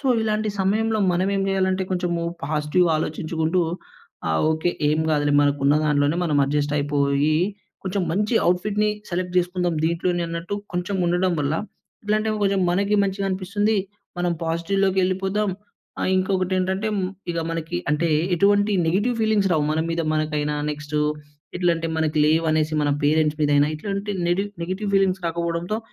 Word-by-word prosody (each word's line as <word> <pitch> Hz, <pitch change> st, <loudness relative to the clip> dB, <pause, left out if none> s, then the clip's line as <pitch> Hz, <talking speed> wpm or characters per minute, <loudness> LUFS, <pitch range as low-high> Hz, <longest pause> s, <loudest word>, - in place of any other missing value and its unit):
So 270 Hz, -, -1 dB
ఇలాంటి 215 Hz, 0 st, 0 dB
సమయంలో 220 Hz, +3 st, +1 dB
మనం 185 Hz, +2 st, +1 dB
ఏం 195 Hz, -, 0 dB
చేయాలంటే, 190 Hz, 0 st, +1 dB
కొంచెం 180 Hz, -1 st, -1 dB, 0.4 s
పాజిటివ్‌గా 155 Hz, +3 st, +1 dB
ఆలోచించుకుంటూ 160 Hz, +2 st, -1 dB, 0.7 s
ఆహ్, 80 Hz, -, +1 dB
ఓకె 160 Hz, +2 st, 0 dB, 0.2 s
ఏమి 155 Hz, +1 st, +1 dB
కాదులే 145 Hz, -1 st, +1 dB
మనకు 145 Hz, 0 st, +1 dB
ఉన్న 145 Hz, -, +5 dB
దాంట్లోనే 145 Hz, +1 st, +2 dB
మనం 150 Hz, -3 st, +1 dB
అడ్జస్ట్ 145 Hz, +1 st, 0 dB
అయిపోయి 145 Hz, +1 st, +1 dB, 0.5 s
కొంచెం 190 Hz, +1 st, -1 dB
మంచి 210 Hz, +5 st, 0 dB
అవుట్‌ఫిట్‌ని 210 Hz, +4 st, +1 dB, 0.2 s
సెలెక్ట్ 180 Hz, 0 st, -3 dB
చేసుకుందాం. 180 Hz, -1 st, +1 dB
దీంట్లోనే 175 Hz, +1 st, 0 dB
అన్నట్టు 170 Hz, +4 st, -4 dB, 0.2 s
కొంచెం 180 Hz, +3 st, -2 dB
ఉండడం 180 Hz, +1 st, +1 dB
వల్ల 145 Hz, 0 st, 0 dB, 0.5 s
ఎట్లాంటే, 215 Hz, +1 st, +1 dB
కొంచెం 195 Hz, -1 st, +2 dB
మనకి 200 Hz, +3 st, +1 dB
మంచిగా 195 Hz, 0 st, -1 dB
అనిపిస్తుంది. 200 Hz, +3 st, 0 dB, 0.4 s
మనం 175 Hz, 0 st, +1 dB
పాజిటివ్‌లోకేళ్ళిపోదాం. 190 Hz, +4 st, 0 dB, 0.5 s
ఆహ్, -, -, 0 dB
ఇంకొకటేంటంటే 185 Hz, +1 st, 0 dB, 0.4 s
ఇగా 170 Hz, -1 st, -2 dB
మనకి 165 Hz, -, -3 dB
అంటే 155 Hz, +3 st, +1 dB, 0.3 s
ఎటువంటి 205 Hz, +3 st, +3 dB
నెగెటివ్ 205 Hz, +9 st, +1 dB
ఫీలింగ్స్ 215 Hz, -3 st, +2 dB
రావు 155 Hz, -3 st, +2 dB
మన 155 Hz, -, 0 dB
మీద 165 Hz, 0 st, -1 dB
మనకైనా, 150 Hz, -1 st, -1 dB
నెక్స్టు 150 Hz, 0 st, -4 dB, 0.6 s
ఎట్లాంటే 170 Hz, -2 st, +1 dB
మనకు 160 Hz, -1 st, 0 dB
లేవు 160 Hz, +2 st, +2 dB
అనేసి 155 Hz, 0 st, +1 dB
మన 145 Hz, -, +1 dB
పేరెంట్స్ 155 Hz, 0 st, +2 dB
మీదైన. 145 Hz, -1 st, +4 dB
ఇట్లాంటి 200 Hz, +4 st, -4 dB, 0.2 s
నెడి 175 Hz, +3 st, +1 dB, 0.2 s
నెగెటివ్ 190 Hz, +4 st, -3 dB
ఫీలింగ్స్ 190 Hz, -1 st, +2 dB
రాకపోవడంతో 170 Hz, +4 st, -2 dB
175 Hz, 140 wpm, -23 LUFS, 155-195 Hz, 0.7 s, ఉన్న